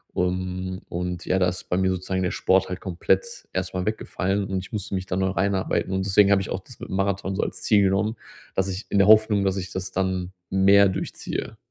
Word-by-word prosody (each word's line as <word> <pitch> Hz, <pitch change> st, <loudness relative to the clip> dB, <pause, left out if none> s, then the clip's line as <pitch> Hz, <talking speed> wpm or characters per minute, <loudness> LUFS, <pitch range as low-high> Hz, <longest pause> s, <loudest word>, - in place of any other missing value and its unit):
Ähm, 90 Hz, +1 st, -2 dB
und 90 Hz, 0 st, -3 dB
ja, 95 Hz, -, +1 dB
da 90 Hz, -, +3 dB
ist 90 Hz, 0 st, -8 dB
bei 90 Hz, -, +1 dB
mir 95 Hz, 0 st, +2 dB
sozusagen 95 Hz, +1 st, -2 dB
der 90 Hz, -, 0 dB
Sport 95 Hz, 0 st, +2 dB
halt 90 Hz, 0 st, -5 dB
komplett 105 Hz, -, -1 dB
erstmal 95 Hz, 0 st, -2 dB
weggefallen 100 Hz, -2 st, -1 dB
und 95 Hz, 0 st, -2 dB
ich 95 Hz, -, -9 dB
musste 100 Hz, -2 st, -3 dB
mich 95 Hz, -, -3 dB
da 90 Hz, -, -3 dB
neu 95 Hz, 0 st, +1 dB
reinarbeiten 95 Hz, 0 st, 0 dB
und 95 Hz, 0 st, 0 dB
deswegen 100 Hz, 0 st, +5 dB
habe 100 Hz, -1 st, +4 dB
ich -, -, -6 dB
auch -, -, -2 dB
das -, -, -15 dB
mit -, -, -8 dB
dem -, -, -3 dB
Marathon 95 Hz, 0 st, -1 dB
so -, -, 0 dB
als -, -, -4 dB
Ziel 105 Hz, -2 st, +4 dB
genommen, 100 Hz, +4 st, +1 dB, 0.4 s
dass 95 Hz, 0 st, +1 dB
ich 95 Hz, +3 st, -5 dB
in 100 Hz, -, +1 dB
der 100 Hz, 0 st, +5 dB
Hoffnung, 110 Hz, -2 st, +5 dB
dass 95 Hz, -, +1 dB
ich 95 Hz, 0 st, -5 dB
das 95 Hz, 0 st, -4 dB
dann 95 Hz, -1 st, -2 dB, 0.2 s
mehr 100 Hz, +1 st, +5 dB
durchziehe. 95 Hz, -, -4 dB
95 Hz, 230 wpm, -24 LUFS, 95-100 Hz, 0.4 s, deswegen